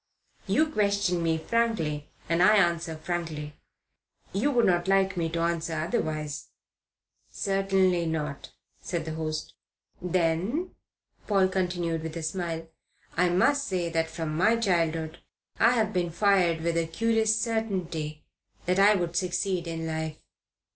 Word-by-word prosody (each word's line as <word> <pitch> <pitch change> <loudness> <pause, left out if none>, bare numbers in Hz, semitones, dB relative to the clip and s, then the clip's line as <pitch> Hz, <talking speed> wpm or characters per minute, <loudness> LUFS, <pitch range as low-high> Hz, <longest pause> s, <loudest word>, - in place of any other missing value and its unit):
You 310 - +3
question 200 - +1
me 165 -1 +1
frankly 160 -7 -1 0.2
and 165 +1 +1
I 210 +4 +7
answer 170 -4 +1
frankly. 155 -3 -4 0.8
You 215 +10 +1
would 245 -5 +3
not 175 0 +2
like 195 0 +3
me 165 -2 -1
to 165 +1 -2
answer 170 -1 -1
otherwise." 155 -4 -2 0.8
"Certainly 195 -3 +1
not," 150 -3 -3 0.3
said 170 -3 -3
his 160 -1 -4
host. 155 -1 -4 0.5
"Then," 180 - 0 0.6
Paul 195 -3 +3
continued, 175 -3 -1
with 160 +1 -5
a 165 - -5
smile, 165 0 -3 0.5
"I 180 +1 +3
must 280 +11 +2
say 180 -3 -1
that 165 -1 0
from 160 -1 -4
my 215 +8 +4
childhood 165 -6 0 0.4
I 230 +2 +5
have 220 -3 +1
been 175 -2 0
fired 175 -3 +2
with 170 0 0
a 165 -1 +1
curious 220 +4 +2
certainty 185 -10 -2 0.4
that 180 +2 +1
I 205 +2 +6
would 175 -2 -2
succeed 180 -1 -1
in 165 -1 -4
life. 160 -1 -3
175 Hz, 140 wpm, -27 LUFS, 160-195 Hz, 0.8 s, I